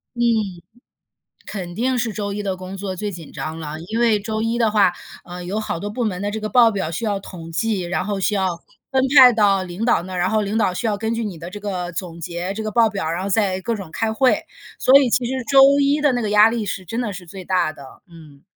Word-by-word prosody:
嗯。 240 - -2 1.2
肯 180 -4 -6
定 255 +2 0
是 235 -2 -1
周 205 -1 -3
一 205 +1 -4
的 190 -2 -2
工 185 +1 -8
作 190 -1 -5
最 205 +1 -4
紧 165 -4 -10
张 160 +1 -5
了， 155 0 -6
因 225 +2 -2
为 225 -3 +4
周 215 +1 -3
一 230 +1 -1
的 230 -2 +3
话， 200 -4 +4 0.3
嗯， 180 0 -8
有 210 +4 -2
好 190 - -3
多 205 - -4
部 245 +3 -3
门 195 -3 -2
的 205 - -2
这 220 - -4
个 215 - -3
报 235 -2 +5
表 190 -5 -2
需 195 +8 -4
要 200 -2 -1
统 165 -4 -10
计， 215 0 0
然 180 +1 -2
后 205 -1 -2
需 205 +2 0
要 190 -1 +1 0.4
分 265 -1 +2
派 255 -3 +9
到 200 -3 +3
领 185 +4 -5
导 235 - +2
那 185 +1 -8
儿， - - -3
然 180 +1 +1
后 215 -1 +1
领 205 +3 -1
导 190 -4 +1
需 225 +4 -2
要 205 -1 -1
根 225 +1 -1
据 230 - -2
你 185 -6 -5
的 170 - -7
这 205 +2 -8
个 180 -4 -4
总 170 -1 -6
结、 175 +3 -4
这 220 +2 -5
个 215 - -3
报 230 -2 +4
表， 190 -6 -3
然 180 +2 -3
后 200 - -3
再 190 -2 +1
各 230 +3 -2
种 180 -5 -9
开 220 +3 -1
会。 255 +3 +3 0.4
所 270 +2 +7
以 260 - +2
其 245 +1 +1
实 260 0 -3
周 275 +2 +6
一 285 +1 +2
的 290 -2 +3
那 245 - 0
个 215 -2 -2
压 210 +2 +6
力 225 -3 -2
是 185 0 -4
真 225 +7 -4
的 215 -4 -2
是 180 -1 -8
最 185 +1 -9
大 180 -4 +1
的， 140 -3 -14
嗯。 155 -4 -15
205 Hz, 290 characters per minute, -21 LUFS, 180-225 Hz, 1.2 s, 派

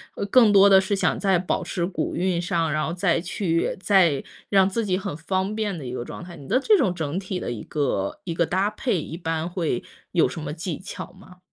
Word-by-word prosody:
呃 - - -3
更 225 +1 +5
多 200 0 +7
的 195 -1 +8
是 200 +2 -2
想 195 - +1
在 195 -3 +2
保 185 +1 -1
持 175 0 -2
古 180 - -3
韵 180 -1 0
上？ 170 -2 0
然 155 0 0
后 - - -3
再 175 -1 +1
去 170 -1 -1
再 180 -9 +4 0.3
让 195 -2 +5
自 225 +3 -1
己 185 -2 +1
很 195 -4 -4
方 190 +5 -2
便 215 -1 -1
的 145 - -7
一 125 - -5
个 125 - -3
状 - - -8
态？ 175 0 -10
你 140 -4 -12
的 255 - +3
这 420 +9 +4
种 190 - +2
整 160 -2 -3
体 190 -1 -3
的 - - -4
一 110 -3 -5
个 130 -10 -2
一 170 - -3
个 170 - +2
搭 190 +4 +1
配 210 -4 -1
一 155 - -7
般 165 -1 -2
会 170 -9 -2 0.3
有 170 - +3
什 165 - -6
么 155 - -4
技 165 0 -4
巧 185 -1 -8
吗？ 185 -1 -16
180 Hz, 260 characters per minute, -24 LUFS, 165-195 Hz, 0.3 s, 的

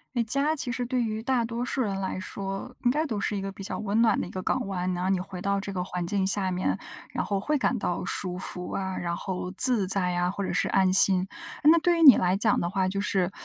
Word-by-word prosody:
那 240 - +2
家 275 +7 +1
其 255 -3 -3
实 250 0 -3
对 250 0 -1
于 220 -1 -3
大 250 -2 0
多 230 +1 -4
数 265 - -3
人 200 -5 -2
来 190 -1 -3
说， 195 +6 -6
应 245 - +3
该 305 +4 0
都 230 -8 -3
是 205 - -2
一 - - -3
个 195 - -4
比 195 0 -10
较 - - -4
温 215 +1 0
暖 225 -3 +3
的 - - -3
一 - - -10
个 185 0 -6
港 - - -1
湾。 185 -1 -2
然 175 - -4
后 185 - -1
你 190 - +2
回 180 -1 -8
到 200 +1 0
这 200 - -6
个 185 -2 -3
环 180 -2 -4
境 190 +1 -1
下 195 -1 0
面， 180 +1 -1 0.3
然 - - -2
后 200 -1 -2
会 300 +10 -1
感 250 -2 0
到 175 - -2
舒 180 -1 -3
服 180 -1 -5
啊， 190 -1 -3
然 170 -1 -3
后 180 0 -5
自 215 0 +6
在 185 -1 +3
呀， 175 0 0
或 200 +2 -4
者 - - -3
是 - - 0
安 190 -1 +2
心。 185 -1 +5 0.4
那 320 +3 +6
对 345 +1 +1
于 330 - +2
你 275 -5 +10
来 180 +1 +1
讲 210 +1 +1
的 170 - -2
话， 190 0 0
就 195 +1 -3
是 190 -2 0
195 Hz, 295 characters per minute, -26 LUFS, 185-235 Hz, 0.4 s, 你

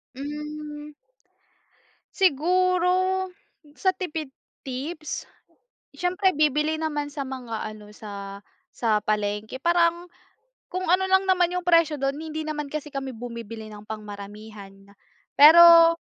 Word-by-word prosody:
Hmm. 300 +1 -7 1.2
Siguro 365 +2 +2 0.5
sa 375 - +2
tipid 325 -6 -5 0.3
tips, 290 +5 -5 0.6
siyempre 365 -1 0
bibili 305 +1 +2
naman 295 -2 -3
sa 285 -1 -5
mga 250 -4 -5
ano, 215 -1 -9
sa 200 -2 -8 0.3
sa 215 -3 0
palengke. 210 +2 -2
Parang 340 +3 +2 0.6
kung 370 - -4
ano 380 +1 +3
lang 380 0 +4
naman 360 -2 +2
yung 360 - -2
presyo 335 -5 +3
dun. 275 +1 -1
Hindi 315 0 -5
naman 300 -1 -4
kasi 300 +1 -6
kami 270 -2 -5
bumibili 230 -2 -8
ng 210 0 -12
pang 215 0 -6
maramihan. 205 0 -10 0.6
Pero 335 +2 +9
300 Hz, 115 wpm, -25 LUFS, 230-340 Hz, 1.2 s, Pero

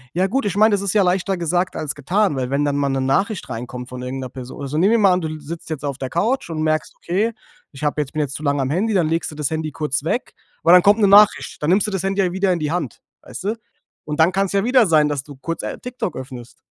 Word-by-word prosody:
Ja, 185 +2 +2
gut 265 +3 -1
ich 200 - -1
meine, 215 +1 +5
das 200 - +1
ist 200 -1 -2
ja 205 -2 +4
leichter 185 +1 0
gesagt 175 +2 -1
als 150 -3 -4
getan. 180 +4 +1
Weil 130 -1 -2
wenn 140 +2 +1
dann 140 -1 0
mal 140 -1 +1
'ne 135 0 0
Nachricht 190 - 0
reinkommt 125 +2 -6
von 125 0 -7
irgend 130 +1 -5
'ner 130 - -5
Person 130 +2 -9
Also, 140 +2 -3
nehmen 195 +6 +4
wir 230 - +4
mal 195 -3 +5
an, 180 - 0
du 155 -1 -4
sitzt 160 +3 -8
jetzt 150 -2 -5
auf 140 -2 -3
der 130 -2 -4
Couch 220 - 0
und 155 -1 -3
merkst: 155 0 0
„Okay, 210 +6 -1 0.4
ich 140 +1 -11
habe 150 0 0
jetzt 140 - -6
bin 155 - -1
jetzt 140 -2 -3
zu 155 - -7
lange 140 -1 +1
am 130 - -1
Handy.“ 205 +8 0
Dann 175 -5 +2
legst 165 -1 -1
du - - -10
das 150 -2 -2
Handy 160 -1 -2
kurz 145 -1 -2
weg. 235 +10 -2 0.3
Und 170 +2 +6
dann 180 - +9
kommt 205 +2 +5
'ne 205 - +4
Nachricht. 205 -4 +5
Dann 150 - 0
nimmst 200 +4 +3
du - - -3
das 190 -1 -2
Handy 195 +1 0
ja 180 -2 +1
wieder 190 0 +1
in 170 - -2
die 150 0 -2
Hand, 165 -10 -3 0.2
weißt - - -9
du? 215 +3 0 0.5
Und 150 +1 -4
dann 165 +3 +5
kann's 195 +1 0
ja 200 0 +2
wieder 245 -3 +4
sein, 155 -2 +4
dass 140 -2 -2
du 145 -1 -12
kurz, 165 +5 -5
äh, - - -4
TikTok 250 -9 -5
öffnest. 130 -2 -9
160 Hz, 290 wpm, -20 LUFS, 140-195 Hz, 0.5 s, dann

